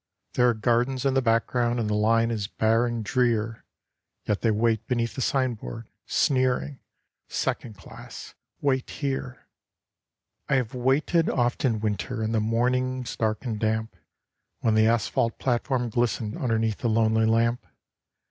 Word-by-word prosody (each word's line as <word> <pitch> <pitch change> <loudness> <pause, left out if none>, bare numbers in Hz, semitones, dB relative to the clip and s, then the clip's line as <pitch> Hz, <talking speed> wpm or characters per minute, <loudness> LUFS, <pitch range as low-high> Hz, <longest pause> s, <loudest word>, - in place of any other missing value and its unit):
There 125 0 +4
are 120 - +1
gardens 120 +4 +1
in 135 - +3
the 135 - +3
background, 120 0 +1
and 110 - -1
the 105 - 0
line 115 +2 +2
is 105 -3 -2
bare 115 +3 +2
and 115 -2 -3
drear, 115 -2 0 0.6
Yet 105 - -1
they 115 - +2
wait 110 0 +1
beneath 120 -3 -1
a 130 - -3
signboard, 120 -4 -2 0.2
sneering 130 0 +1 0.5
'Second 110 -4 -3
class - - -11 0.3
wait 130 -2 0
here.' 135 -3 -4 1.0
I - - +3
have 125 -4 0
waited 135 +6 +2
oft 120 -1 0
in 110 -4 +1
winter, 110 +3 -2
in 110 - -1
the 115 - +2
mornings 125 +3 0
dark 110 +2 -1
and 110 -4 -3
damp, 110 0 -1 0.7
When 110 - +2
the 110 0 +4
asphalt 115 0 +1
platform 125 -1 0
glistened 110 -2 -1
underneath 115 -3 0
the 120 - 0
lonely 110 0 +3
lamp. 115 +2 +2
115 Hz, 150 wpm, -26 LUFS, 110-125 Hz, 1.0 s, There